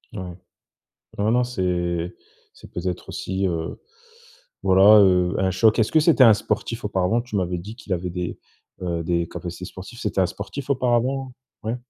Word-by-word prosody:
Ah, 95 - -4
ouais. 90 -1 -8 0.8
Non, 105 +2 +1
non, 125 +2 +3
c'est 90 -6 -2 0.4
c'est - - -15
peut-être 90 0 -4
aussi, 95 +1 -2
heu, 85 -2 -3 0.8
voilà, 95 +3 +7
heu, 90 -2 +4
un 95 0 +1
choc. 105 +4 +3
Est-ce 110 -1 +2
que 160 - +5
c'était 150 -4 +5
un 115 -3 +8
sportif, 110 +2 -3
auparavant? 100 +2 +1
Tu 120 -3 -5
m'avais 90 -2 -1
dit 105 +6 -9
qu'il 105 - -7
avait 90 0 -2
des, 90 0 -4 0.4
heu, 85 -2 -2
des 85 0 0
capacités 90 +1 -7
sportives. 95 +6 -10
C'était 105 -5 -1
un 95 - +4
sportif, 100 +10 -7
auparavant? 130 +1 +1 0.3
Ouais. 115 +2 -1
95 Hz, 170 wpm, -23 LUFS, 90-115 Hz, 0.8 s, un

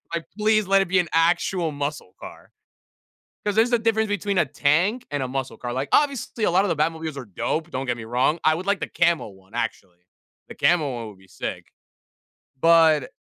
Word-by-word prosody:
Like, 170 - -4
"Please 215 -1 +2
let 195 0 +4
it - - -9
be 185 0 +2
an 175 - 0
actual 170 +1 +1
muscle 145 -8 -5
car." - - -12 0.9
'Cause 205 - +1
there's 230 +3 +3
a 240 - +4
difference 220 -1 +1
between 205 -1 -1
a 155 - +2
tank 175 - +1
and 145 -2 -2
a 130 - -2
muscle 130 0 -4
car. 120 -1 -4
Like, 135 +2 -3
obviously, 275 -6 +1
a - - +3
lot 185 +3 +3
of - - -1
the - - +1
Batmobiles 160 0 -2
are 135 - -6
dope. 155 - -3
Don't 135 -3 -4
get 120 -1 -1
me 115 - -7
wrong. 125 +8 +1
I 155 - +4
would 180 +3 -6
like 200 -1 +1
the - - -3
camo 170 -4 +1
one, 95 0 -18
actually. 100 -6 -4 0.5
The - - -10
camo 150 -7 +2
one 115 -2 -6
would 100 - -15
be 95 - -20
sick. - - -6 0.9
But 160 -4 +4
160 Hz, 215 wpm, -23 LUFS, 130-195 Hz, 0.9 s, let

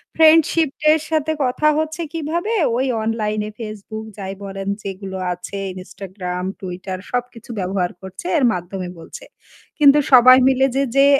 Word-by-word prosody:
Friendship 320 -2 +4
এর 315 - +4
সাথে 315 -1 0
কথা 260 +4 +1
হচ্ছে 315 +1 -2
কিভাবে? 330 +6 -2 0.3
ওই 260 - +1 0.2
অনলাইন 215 -1 -1
এ - - -5
Facebook 215 0 -7
যাই 195 -1 -5
বলেন 195 0 -6 0.2
যেগুলো 190 0 -6 0.2
আছে, 180 +3 -8 0.2
Instagram, 185 -1 -6 0.2
Twitter 185 0 -6
সবকিছু 245 -2 -4
ব্যবহার 185 -1 -1
করছে 190 - -9
এর 285 - +1
মাধ্যমে 180 +1 -5
বলছে। 165 - -10 0.6
কিন্তু 285 -1 +7
সবাই 255 0 +9
মিলে 265 0 +3
যে, 275 - +2
যে 275 0 +6
220 Hz, 145 wpm, -20 LUFS, 190-280 Hz, 0.6 s, সবাই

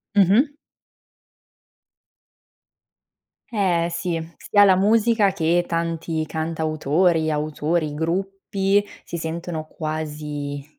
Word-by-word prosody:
Mh-mh. 210 - +4 3.0
Eh 180 -6 +1
sì, 170 0 -2 0.2
sia 205 -1 +4
la 195 -2 +6
musica 210 +1 +3
che 175 -1 +1
tanti 165 -1 -2
cantautori, 160 +1 0
autori, 155 +1 -1
gruppi, 195 +4 0 0.2
si 170 - -6
sentono 160 0 -4
quasi 150 -3 -5
165 Hz, 80 wpm, -22 LUFS, 155-195 Hz, 3.0 s, la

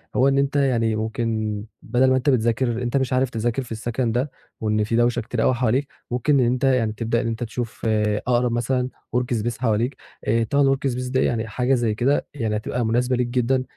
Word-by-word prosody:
هو 130 - +4
إن 135 0 +3
أنت 140 +1 +1
يعني 120 -6 +2
ممكن 110 -1 -2 0.3
بَدَل 125 +3 +2
ما 130 - +4
أنت 130 +2 +1
بتذاكر 120 -1 +1
أنت 120 +3 0
مش 130 -1 0
عارف 130 0 +2
تذاكر 120 +2 -1
في 120 - -14
السَكَن 115 +2 -1
ده، 125 +5 -1 0.3
وإن 105 -1 +1
في 110 +2 -1
دوشة 120 +1 +2
كتير 115 0 -2
أوي - - +4
حواليك، 125 +3 +1 0.2
ممكن 135 +4 +2
إن 125 - +4
أنت 125 +2 0
يعني 125 -5 +2
تبدأ 115 +1 -1
إن 120 - -2
أنت 115 +1 -3
تشوف 115 0 -5 0.5
أقرب 120 -1 +2
مثلًا 125 +2 0 0.3
work 125 0 0
space 120 +1 -2
حواليك 120 +2 0 0.5
طبعًا 140 -1 +3
الwork 135 0 -2
space 125 +1 -4
ده 130 - +2
يعني 110 -1 0
حاجة 125 +4 0
زي 120 -4 +1
كده 130 +6 +1
يعني 115 -7 -2
هتبقى 120 +3 -2
مناسبة 125 +3 +1
ليك 125 0 0
جدًا، 130 +1 +1
120 Hz, 210 wpm, -23 LUFS, 115-130 Hz, 0.5 s, هو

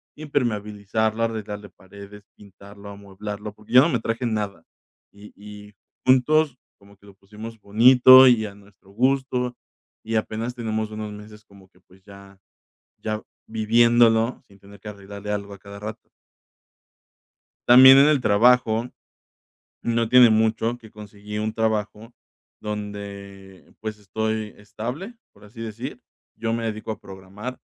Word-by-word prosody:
impermeabilizarlo, 110 -5 -2
arreglarle 105 -2 -5
paredes, 100 +2 -14
pintarlo, 100 0 -14
amueblarlo, 100 +1 -8
porque 105 +2 -15
yo 125 - +9
no 165 - +2
me 125 - 0
traje 115 +2 -3
nada. 105 -6 -3 0.5
Y 100 +1 -15
y 105 0 -13 0.3
juntos, 130 +2 +3 0.2
como 100 0 -20
que 100 - -24
lo 100 - -15
pusimos 105 +3 -11
bonito 125 +5 +7
y 115 -3 +3
a 100 - -9
nuestro 100 -1 -21
gusto, 125 +1 -1 0.5
y 115 +1 -4
apenas 110 +2 -3
tenemos 110 -2 -3
unos 110 0 -6
meses 105 +1 -12
como 100 -2 -20
que, 90 -1 -29
pues, 95 +1 -24
ya 100 -1 -15 0.6
ya 110 0 -5 0.2
viviéndolo 115 +1 +2
sin 100 - -20
tener 100 +1 -17
que 105 - -10
arreglarle 100 0 -9
algo 100 -1 -4
a 100 - -11
cada 100 +1 -12
rato. 105 +2 -9 1.6
También 130 +2 +9
en 140 +2 +6
el 150 -3 +2
trabajo, 115 +1 +3 0.9
no 115 0 0
tiene 125 0 +7
mucho 110 +2 +1
que 115 -2 -16
conseguí 105 0 -10
un 110 +1 -2
trabajo 110 +1 -3 0.5
donde, 100 -2 -8
pues, 110 -1 -6
estoy 110 +1 -4
estable, 125 - -7 0.2
por 100 - -21
así 110 +3 -12
decir. 115 +4 -7 0.4
Yo 115 -1 -2
me 115 0 -3
dedico 110 0 -4
a 110 - -7
programar, 95 +6 -9
110 Hz, 140 wpm, -23 LUFS, 100-115 Hz, 1.6 s, yo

